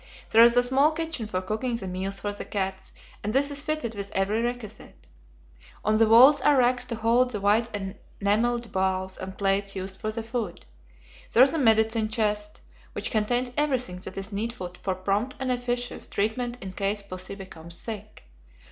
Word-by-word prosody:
There 225 +1 +8
is 235 +1 +6
a 245 - +6
small 275 +5 +3
kitchen 320 -8 -2
for 185 -3 -3
cooking 220 +5 -2
the 205 -5 -4
meals 190 +2 -3
for 205 0 -2
the 205 - -6
cats, 190 -1 -3 0.3
and 210 +1 -2
this 280 +2 +2
is 285 0 -1
fitted 305 -7 -2
with 200 -1 -5
every 200 +4 +1
requisite. 235 - -6 0.8
On 215 +1 +3
the 225 0 +5
walls 255 +6 +8
are 290 -2 +4
racks 250 0 +3
to 235 - -3
hold 230 +3 +3
the 215 -4 -4
white 210 +4 +2 0.5
enamelled 230 +4 +1
bowls 190 0 -1
and 190 0 -7
plates 195 0 +1
used 190 0 -6
for 215 - -2
the 225 +1 -4
food. 225 -5 -4 0.7
There 240 - +8
is 270 - +4
a 325 - 0
medicine 220 -2 +3
chest, 210 -2 -1 0.3
which - - -2
contains 245 +3 +1
everything 260 -10 0
that 180 - -8
is 195 +2 -5
needful 200 -3 -4
for 190 -2 -1
prompt 200 +8 -1
and 260 -1 -1
efficacious 245 0 -2
treatment 240 +4 -1
in 190 - -6
case 200 +1 -1
pussy 185 0 -6
becomes 170 -4 -9
sick. 215 - -8
220 Hz, 185 wpm, -26 LUFS, 195-245 Hz, 0.8 s, There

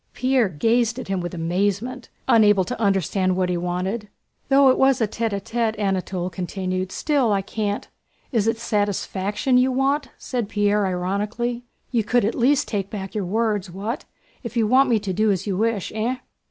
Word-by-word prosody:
Pierre 255 -4 +2
glanced 230 - +1
at 255 - -7
him 190 -2 0
with 175 0 -5
amazement, 200 +9 -1 0.2
unable 210 -5 +5
to 250 +2 -5
understand 190 -2 +1
what 185 -1 +1
he 180 - 0
wanted. 180 +5 -2 0.4
"Though 275 0 +6
it 255 - +3
was 265 -1 +4
tête 225 +1 0
à 200 -1 -2
tête," 225 +1 -1
Anatole 190 -2 -1
continued, 185 0 -3
"still 280 -4 +1
I 195 -1 +1
can't..." 205 0 -3 0.4
"Is 225 -4 +1
it 225 0 +1
satisfaction 205 +2 0
you 260 +1 +3
want?" 275 +2 +1
said 240 -5 -3
Pierre 205 -1 +2
ironically. 205 +7 -2 0.3
"You 235 -4 +2
could 245 +1 +2
at 220 - 0
least 280 +4 +2
take 200 -3 -2
back 195 -3 -6
your 210 -3 -2
words. 210 -1 0
What? 205 +8 -4 0.4
If 235 -1 -6
you 225 - +3
want 260 +4 +4
me 235 - +4
to 200 -3 -3
do 215 +3 +2
as 190 -4 0
you 200 -3 -1
wish, 220 -1 0
eh?" 225 +4 -1
210 Hz, 180 wpm, -23 LUFS, 190-240 Hz, 0.4 s, Though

